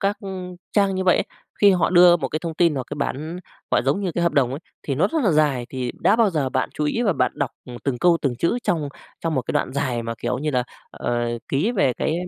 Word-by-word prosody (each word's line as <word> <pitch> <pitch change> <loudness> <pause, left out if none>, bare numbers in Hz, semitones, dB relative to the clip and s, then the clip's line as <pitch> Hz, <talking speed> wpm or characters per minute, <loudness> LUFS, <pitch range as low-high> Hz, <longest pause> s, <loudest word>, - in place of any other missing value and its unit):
các 200 +1 +1 0.6
trang 200 -2 +3
như 185 0 -1
vậy 180 - +5
ấy, - - +1 0.4
khi 205 -1 +7
họ 180 -1 +2
đưa 175 -1 +7
một 170 - -3
cái 155 - -2
thông 165 -1 -5
tin 170 -1 +3
hoặc 130 -2 -3
cái - - -3
bản, 155 +5 -3 0.3
gọi, - - +3
giống 140 +9 +1
như 190 -4 -2
cái 170 - -1
hợp 170 - +2
đồng 135 -5 +2
ấy, 135 +3 -5 0.2
thì 140 - -2
nó 145 - +3
rất 320 -4 +1
là 205 - +3
dài 145 -5 +2
thì 125 -2 -3
đã 210 - +4
bao 230 -3 +4
giờ 150 -6 0
bạn 130 0 -1
chú 150 - -1
ý 230 +11 0
và 205 -5 +3
bạn - - +1
đọc, 140 -4 -2
ừm, 125 -1 -9
từng 135 -3 -1
câu 175 +3 +4
từng 130 -4 0
chữ 170 - +1
trong 155 -9 0 0.3
trong 165 -1 -1
một 130 - 0
cái - - -4
đoạn - - 0
dài 130 -4 -1
mà, 115 0 -4
kiểu 125 +1 -2
như 150 +3 -1
là, 125 -3 +1 0.3
ờ, - - -3 0.3
ký 155 - +1
về 160 - +2
cái 155 - -1
155 Hz, 275 wpm, -22 LUFS, 130-180 Hz, 0.6 s, khi